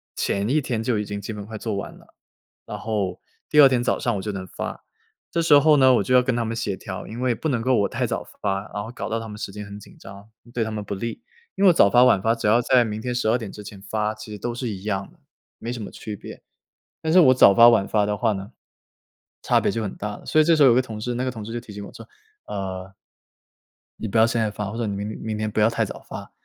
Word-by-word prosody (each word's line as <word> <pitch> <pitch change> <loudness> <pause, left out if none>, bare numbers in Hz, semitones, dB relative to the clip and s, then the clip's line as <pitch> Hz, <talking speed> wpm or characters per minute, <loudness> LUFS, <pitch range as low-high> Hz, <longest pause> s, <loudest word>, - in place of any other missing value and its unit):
前 100 +1 -1
一 155 - +3
天 120 -5 -2
就 115 -3 0
已 105 - -2
经 100 0 -5
基 100 - -6
本 105 -1 -7
快 110 +1 -7
做 110 -1 -3
完 100 - -5
了， - - -21 0.5
然 - - -6
后 105 -5 -2 0.3
第 150 - +6
2 140 - +9
天 125 -2 +1
早 - - +1
上 - - 0
我 - - -4
就 105 - -3
能 95 -2 -6
发。 - - -6 0.5
这 170 - 0
时 145 -3 +7
候 150 +1 +5
呢 130 -1 +6
我 115 - +2
就 125 +6 +1
要 125 - +6
跟 125 -1 0
他 120 - 0
们 115 +1 -3
协 110 -4 -2
调， 95 -2 -7
因 115 +3 -7
为 125 -1 +2
不 155 +7 -3
能 120 -4 0
够 130 +2 +2
我 100 - +1
太 - - -1
早 - - -3 0.2
发， 100 -1 0
然 105 - -3
后 110 - -8
搞 125 - -5
到 115 - -1
他 115 - -7
们 105 -1 -8
时 100 - -5
间 105 +1 -7
很 100 0 -9
紧 - - -16
张， 100 +2 -12 0.2
对 120 - 0
他 110 - -4
们 105 -1 -4
不 100 0 -5
利。 115 - -5 0.3
因 195 - -1
为 185 - +8
早 100 - +5
发 120 +4 +6
晚 100 -6 +4
发 115 +3 +2
只 115 - -2
要 115 +3 +4
在 125 0 +4
明 110 0 -4
天 125 +1 -3
12 120 0 +2
点 110 -5 -7
之 105 - -10
前 100 -1 -10
发， 105 +2 -2
其 110 0 -10
实 105 - -6
都 120 +4 -3
是 125 -1 -3
一 95 -3 -6
样 100 -2 -3
的， - - -26 0.4
没 115 - -5
什 120 - -6
么 - - -7
区 105 - -7
别。 - - -11 0.6
但 160 0 0
是 185 - +7
我 130 -6 +6
早 100 -5 +7
发 115 +3 +8
晚 110 -5 +4
发 105 -1 +2
的 105 0 -1
话 110 +1 +1
呢， 95 0 -6 0.9
差 - - +3
别 - - +1
就 115 - -2
很 100 - -5
大 105 -1 -5
了。 - - -16
所 155 - +2
以 - - +5
这 165 +1 +4
时 150 - +4
候 135 - +8
有 120 - +5
个 130 - +4
同 110 -4 -8
事， 125 +2 -2
那 125 - -2
个 130 - -1
同 110 -3 -8
事 115 - -7
就 120 - -2
提 115 -2 -13
醒 100 0 -7
我 - - -12
说， - - -12 0.4
呃 95 -1 -5 1.1
“你 - - -3
不 110 - 0
要 110 - +6
现 115 0 0
在 110 -1 0
发， 105 0 -5
或 110 - -7
者 120 - -1
你 100 - -2
明 100 +1 -4
明 110 -1 -4
天 110 0 -2
不 105 - -1
要 105 - +5
太 115 -1 0
早 - - -8
发， - - -8
110 Hz, 315 characters per minute, -23 LUFS, 105-120 Hz, 1.1 s, 2